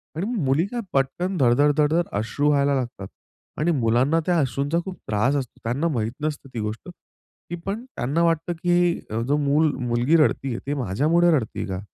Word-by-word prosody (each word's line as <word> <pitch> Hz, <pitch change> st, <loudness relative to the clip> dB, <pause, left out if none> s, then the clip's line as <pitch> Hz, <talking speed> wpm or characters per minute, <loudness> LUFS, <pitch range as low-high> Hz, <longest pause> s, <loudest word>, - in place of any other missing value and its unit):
आणि 165 Hz, +5 st, -2 dB, 0.2 s
मुली 135 Hz, +6 st, +2 dB
काय 240 Hz, +3 st, -4 dB
पटकन, 175 Hz, +8 st, 0 dB
धडधड-धडधड 145 Hz, +5 st, +3 dB
अश्रू 115 Hz, +8 st, 0 dB
वहायला 140 Hz, -1 st, +3 dB
लागतात 120 Hz, -7 st, -4 dB, 0.5 s
आणि 165 Hz, +3 st, +2 dB
मुलांना 130 Hz, +3 st, +2 dB
त्या 175 Hz, -1 st, +2 dB
अश्रूंचा 140 Hz, +3 st, 0 dB
खूप 190 Hz, -2 st, -6 dB
त्रास 110 Hz, +7 st, +1 dB
असतो. 135 Hz, -4 st, -4 dB
त्यांना 130 Hz, +8 st, 0 dB
माहीत 115 Hz, -8 st, -1 dB
नसतं 150 Hz, -2 st, -4 dB
ती 120 Hz, -, -4 dB
गोष्ट, 105 Hz, +7 st, -5 dB
तरी 175 Hz, 0 st, -13 dB
पण 205 Hz, +4 st, -3 dB
त्यांना 160 Hz, -, -1 dB
वाटतं 165 Hz, 0 st, +1 dB
की 175 Hz, -1 st, +2 dB
अ, 110 Hz, +2 st, -2 dB
"जो 140 Hz, +5 st, +1 dB
मूल 150 Hz, +2 st, +2 dB, 0.2 s
मुलगी 120 Hz, +7 st, +2 dB
रडतीये 135 Hz, -5 st, +1 dB
ती 145 Hz, -, 0 dB
माझ्यामुळे 145 Hz, -, +2 dB
रडतीय 115 Hz, -4 st, -4 dB
का?" 95 Hz, -1 st, -3 dB
145 Hz, 170 wpm, -23 LUFS, 120-165 Hz, 0.5 s, धडधड-धडधड